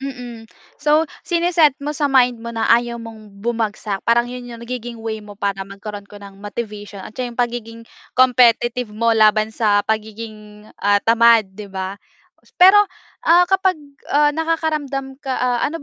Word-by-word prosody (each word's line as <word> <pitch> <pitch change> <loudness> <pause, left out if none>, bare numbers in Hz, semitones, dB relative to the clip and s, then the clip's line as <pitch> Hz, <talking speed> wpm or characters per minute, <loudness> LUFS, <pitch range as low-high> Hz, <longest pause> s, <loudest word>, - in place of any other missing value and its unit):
mm. 245 -4 -8 0.3
So 305 +2 +3 0.2
sine-set 340 -5 +3
mo 295 +1 -4
sa 290 -1 0
mind 250 -3 +3
mo 235 - -7
na 225 - 0
ayaw 235 0 +2
mong 220 -3 -11
bumagsak. 215 -2 -3
Parang 235 +1 +2
'yon 245 0 -8
'yong 235 -1 -9
nagiging 240 -1 -6
way 225 -1 -5
mo 205 -1 -12
para 200 -1 -2
magkaroon 200 +1 -8
ka 205 - -12
ng 200 -1 -13
motivation 205 -1 -7
at - - -10
'yon 240 -2 -4
'yong - - 0
pagiging 230 -1 -7 0.4
competitive 245 -1 +3
mo 230 +1 +2
laban 215 0 +3
sa 205 -2 +2
pagiging, 215 -1 -5 0.2
ah, 205 0 +3
tamad 230 -3 +4
'di 205 +1 -9
ba. 190 +1 -6 0.6
Pero, 375 +3 +8 0.5
ah, 345 +2 +7
kapag 380 0 +1 0.3
ah, 295 0 +3
nakakaramdam 300 -4 -2
ka 265 -3 -3
ah, 245 -1 0
ano 320 - -5
230 Hz, 165 wpm, -19 LUFS, 210-265 Hz, 0.6 s, Pero